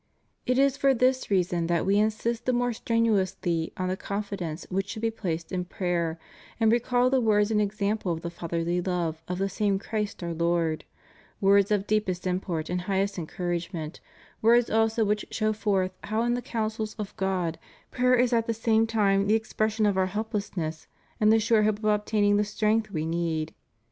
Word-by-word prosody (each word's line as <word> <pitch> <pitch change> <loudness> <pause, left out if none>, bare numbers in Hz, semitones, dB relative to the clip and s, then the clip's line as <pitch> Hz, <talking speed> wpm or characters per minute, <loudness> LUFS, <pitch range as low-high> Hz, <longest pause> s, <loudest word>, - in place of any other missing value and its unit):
It 250 0 +2
is 275 0 +3
for 275 -1 +3
this 255 +2 +1
reason 175 -3 +1
that 170 -1 +1
We 200 +2 +3
insist 220 +3 -1
the 255 - +3
more 245 0 +1
strenuously 195 -8 0
on 185 - -1
the 185 - -1
confidence 200 -5 -4
which 195 +1 -1
should 220 -1 -6
be 225 - +2
placed 170 -7 -4
in 185 -1 -1
praj^er, 175 -3 -2 0.4
and 220 -1 +4
recall 245 +1 +2
the 265 -1 +3
words 210 -1 +3
and 210 -1 +3
ex 210 +1 -3
ample 200 -2 0
of 165 -1 -3
the 170 - -4
Fatherly 170 +1 -2
love 170 -3 -2
of 180 - -3
the 195 +1 0
same 195 0 0
Christ 210 -1 -4
our 170 -1 -3
Lord; 170 -1 0 0.5
words 200 0 +4
of 205 -2 +1
deepest 210 -4 -1
import 180 -3 -2
and 180 0 -2
highest 195 +1 -1
encouragement; 170 -1 -4 0.4
words 235 +2 +4
also 225 0 +2
which 210 +1 -1
show 215 0 0
forth 195 -3 0
how 215 +2 0
in 240 0 +1
the 245 - -1
counsels 220 -2 -3
of 210 -2 -6
God 185 -4 -1 0.3
prayer 250 0 +3
is 250 0 +2
at 230 -1 +2
the 230 - 0
same 225 0 +2
time 200 -3 +2
the 215 - +4
expression 220 0 0
of 200 -2 +2
our 185 - +2
help 215 +4 -4
lessness 165 -6 -3 0.3
and 215 0 +5
the 225 - +5
sure 220 0 +3
hope 210 -1 +2
of 215 - -8
obtaining 210 -1 +2
the 210 - +3
strength 215 +1 0
we 160 -5 -3
need. 165 -1 -2
205 Hz, 195 wpm, -27 LUFS, 180-220 Hz, 0.5 s, and